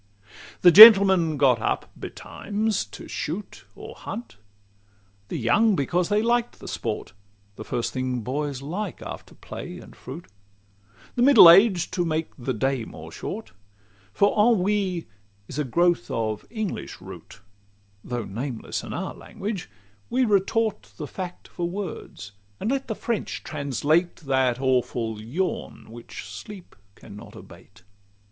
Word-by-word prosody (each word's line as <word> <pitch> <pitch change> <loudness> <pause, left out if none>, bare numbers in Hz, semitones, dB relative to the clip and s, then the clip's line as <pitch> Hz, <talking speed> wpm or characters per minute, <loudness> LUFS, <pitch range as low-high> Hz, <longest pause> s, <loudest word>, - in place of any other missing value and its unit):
CI 100 +1 -34 0.3
The 175 - +8
gentlemen 190 -6 +9
got 130 -5 +3
up - - -2
betimes 210 0 -3
to - - -11
shoot, 175 +8 -6
Or - - -10
hunt: 230 - -8 0.9
the - - -4
young, 205 - +3
because 175 +4 0
they 210 +1 +2
liked 240 +1 0
the - - -10
sport - - -4 0.4
The 110 - -8
first 120 +1 -3
thing 130 -1 -2
boys 140 +3 -3
like 180 +5 -5
after - - -9
play - - -8
and - - -13
fruit; 85 - -9 0.9
The 240 - -2
middle 245 -8 +9
aged 190 -1 +4
to 175 - 0
make 160 -1 -2
the 130 -1 -4
day 130 +2 -1
more - - -10
short; - - -7 0.6
For 200 - +2
ennui 205 -5 +2 0.4
is 145 - -6
a - - +1
growth 170 -1 +1
of 110 -2 -3
English 220 -4 -5
root, - - -12 0.6
Though 120 -3 -4
nameless 120 +4 -5
in - - -8
our - - -4
language: 200 -3 -6 0.4
we 255 +1 +2
retort 215 +1 0
The 155 - -5
fact 180 +3 -7
for 175 0 -4
words, 175 - -7 0.3
and 225 - -1
let 270 0 -2
the 220 - -3
French 230 -1 -3
translate 155 +4 0
That 130 -4 0
awful 120 -4 -1
yawn 135 -1 -4
which 120 0 -10
sleep 140 - -11 0.2
can 105 - -13
not 105 - -12
abate. - - -15
165 Hz, 140 wpm, -24 LUFS, 125-205 Hz, 0.9 s, gentlemen